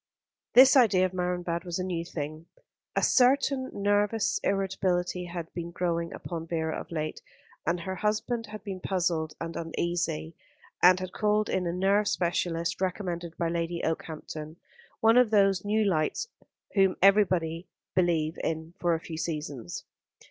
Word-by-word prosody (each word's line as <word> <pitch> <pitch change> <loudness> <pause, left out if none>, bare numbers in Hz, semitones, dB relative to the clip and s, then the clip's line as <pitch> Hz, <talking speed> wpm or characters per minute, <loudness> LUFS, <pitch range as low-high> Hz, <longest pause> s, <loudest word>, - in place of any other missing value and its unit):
This 260 +3 +8
idea 210 -8 +5
of 185 - -3
Marienbad 180 -2 -2
was 175 -2 -3
a 185 - -2
new 175 -3 -2
thing. 155 -1 -6 0.5
A - - +1
certain 265 +1 +3
nervous 205 +2 +1
irritability 185 -2 0
had 170 -1 -6
been 170 -1 -5
growing 170 -1 -1
upon 165 -1 -6
Vera 160 -1 -1
of - - -7
late, 155 -2 -4 0.5
and 175 0 +1
her 190 +2 -4
husband 220 +2 -1
had 215 -1 -9
been 195 -3 -5
puzzled 170 -5 -1
and 165 0 -5
uneasy, 165 -1 -2 0.5
and 185 +1 +7
had 185 -1 -6
called 210 0 +1
in 180 -2 0
a - - 0
nerve 195 +3 +2
specialist 170 -1 -1
recommended 175 -3 -3
by 170 - 0
Lady 170 0 -2
Okehampton, 155 -1 -5 0.5
one 225 +2 +5
of 250 -3 +4
those 195 -3 +3
new 215 +1 +1
lights 185 - 0 0.4
whom 195 -2 +4
everybody 185 -4 +3 0.3
believe 170 -3 +1
in 160 +1 -3
for 175 -1 +2
a - - -3
few 160 -1 -7
seasons. 150 - -4
175 Hz, 150 wpm, -28 LUFS, 165-195 Hz, 0.5 s, This